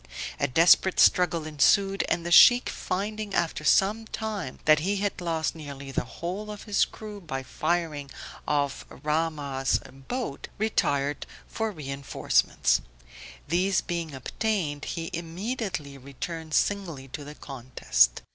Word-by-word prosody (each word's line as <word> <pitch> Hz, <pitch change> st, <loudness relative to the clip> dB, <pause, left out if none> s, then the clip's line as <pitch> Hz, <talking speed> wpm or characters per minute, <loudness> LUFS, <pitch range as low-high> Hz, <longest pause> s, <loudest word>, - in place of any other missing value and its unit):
A -, -, +2 dB
desperate 170 Hz, +6 st, +5 dB
struggle 170 Hz, -3 st, +4 dB
ensued, 195 Hz, +6 st, +3 dB
and 170 Hz, -, 0 dB
the 175 Hz, -, -3 dB
Sheikh 245 Hz, +7 st, +8 dB
finding 210 Hz, +2 st, -3 dB
after 165 Hz, -2 st, 0 dB
some 205 Hz, +8 st, +3 dB
time 210 Hz, -12 st, -4 dB
that 155 Hz, -1 st, +6 dB
he 195 Hz, +6 st, 0 dB
had 200 Hz, -1 st, -2 dB
lost 165 Hz, -2 st, -1 dB
nearly 140 Hz, -3 st, -8 dB
the 125 Hz, -, -1 dB
whole 180 Hz, -, -5 dB
of 210 Hz, -1 st, -7 dB
his 205 Hz, -2 st, +2 dB
crew 210 Hz, -2 st, -9 dB
by 135 Hz, -6 st, -5 dB
the -, -, -19 dB
firing 155 Hz, -5 st, -1 dB, 0.4 s
of 145 Hz, -2 st, 0 dB
Rahmah's 150 Hz, -4 st, -1 dB, 0.3 s
boat, 245 Hz, -, -4 dB
retired 145 Hz, -9 st, 0 dB, 0.2 s
for 225 Hz, -1 st, -2 dB
reinforcements. 140 Hz, -5 st, 0 dB, 0.7 s
These 180 Hz, +4 st, +2 dB
being 170 Hz, -4 st, -4 dB
obtained, 150 Hz, -, -2 dB
he 165 Hz, +2 st, -4 dB
immediately 170 Hz, -, -4 dB
returned 155 Hz, +4 st, -5 dB
singly 170 Hz, -10 st, 0 dB
to 145 Hz, +3 st, -7 dB
the 150 Hz, +1 st, -9 dB
contest. 120 Hz, -, +1 dB
165 Hz, 130 wpm, -27 LUFS, 145-195 Hz, 0.7 s, Sheikh